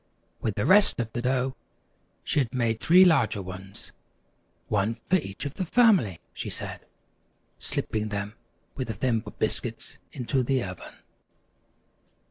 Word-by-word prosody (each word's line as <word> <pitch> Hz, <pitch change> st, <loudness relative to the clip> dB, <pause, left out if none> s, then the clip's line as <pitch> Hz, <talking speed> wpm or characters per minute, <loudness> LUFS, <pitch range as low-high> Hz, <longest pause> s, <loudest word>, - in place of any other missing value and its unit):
With 110 Hz, -3 st, -1 dB
the 100 Hz, -, -1 dB
rest 200 Hz, -4 st, +6 dB
of 115 Hz, -2 st, -3 dB
the 120 Hz, -, -2 dB
dough, 130 Hz, +1 st, 0 dB, 0.7 s
she -, -, +1 dB
had 130 Hz, -3 st, -1 dB
made 115 Hz, -3 st, 0 dB
three 180 Hz, +7 st, +7 dB
larger 155 Hz, -, +3 dB
ones. 95 Hz, +1 st, -9 dB, 0.8 s
"One 105 Hz, +2 st, +1 dB
for 170 Hz, +10 st, +1 dB
each 100 Hz, -, -6 dB
of 140 Hz, -, -4 dB
the 190 Hz, -, -3 dB
family," 185 Hz, -, +4 dB
she -, -, -4 dB
said, -, -, -6 dB, 0.7 s
slipping 110 Hz, 0 st, -2 dB
them 100 Hz, 0 st, -4 dB, 0.4 s
with 130 Hz, -, -4 dB
the 110 Hz, -, -4 dB
Thimble 115 Hz, 0 st, -1 dB
Biscuits -, -, -1 dB
into 130 Hz, +2 st, -1 dB
the 130 Hz, 0 st, +1 dB
oven. 90 Hz, -2 st, -8 dB
120 Hz, 140 wpm, -27 LUFS, 105-140 Hz, 0.8 s, three